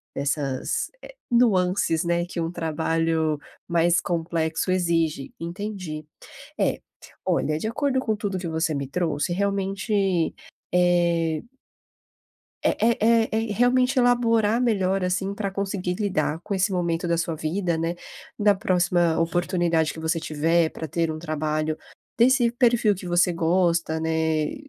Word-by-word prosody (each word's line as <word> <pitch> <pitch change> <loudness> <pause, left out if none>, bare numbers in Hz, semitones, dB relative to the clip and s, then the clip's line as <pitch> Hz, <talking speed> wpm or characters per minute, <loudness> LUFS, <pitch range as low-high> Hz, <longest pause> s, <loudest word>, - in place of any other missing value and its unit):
dessas, 140 -2 -2
eh, - - -12 0.2
nuances, 185 -8 +2
né, 170 0 +1
que 175 0 -6
o 165 0 -2
trabalho 160 -1 0 0.3
mais 170 0 +3
complexo 165 0 -1
exige, 165 -6 0
entendi. 175 -3 -5 0.5
É, - - +1 0.5
olha, 150 0 +1
de 215 - -3
acordo 265 +3 0
com 220 -4 -1
tudo 205 -2 -3
o - - -4
que 175 - -4
você 160 -1 -1
me 140 -1 -3
trouxe 160 +1 -1
realmente, 195 -2 0 0.4
eh 170 -2 +2 1.2
eh - - +3
eh 230 +1 +3
eh 225 0 +4
eh, 220 -1 -1
realmente 250 +2 +3
elaborar 235 -2 +3
melhor 195 -5 +1
assim 190 +2 -1
pra 200 -1 -3
conseguir 190 -2 -2
lidar 165 -6 -1
com 200 - -2
esse 195 +2 +1
momento 175 -1 -1
da 170 - +2
sua 165 0 -1
vida, 170 +2 -1
né, 165 +1 -1 0.5
da 205 -1 +4
próxima 175 -4 +1
oportunidade 170 -1 +1
que - - -9
você 160 +1 0
tiver 160 +2 +1
pra 160 - -7
ter 165 +2 -1
um 155 - -6
trabalho 155 -1 -2 0.4
desse 245 +1 +4
perfil 235 -4 +3
que 185 - -9
você 175 0 +2
gosta, 170 -1 +1
né, 160 -1 0
175 Hz, 140 wpm, -24 LUFS, 160-200 Hz, 1.2 s, eh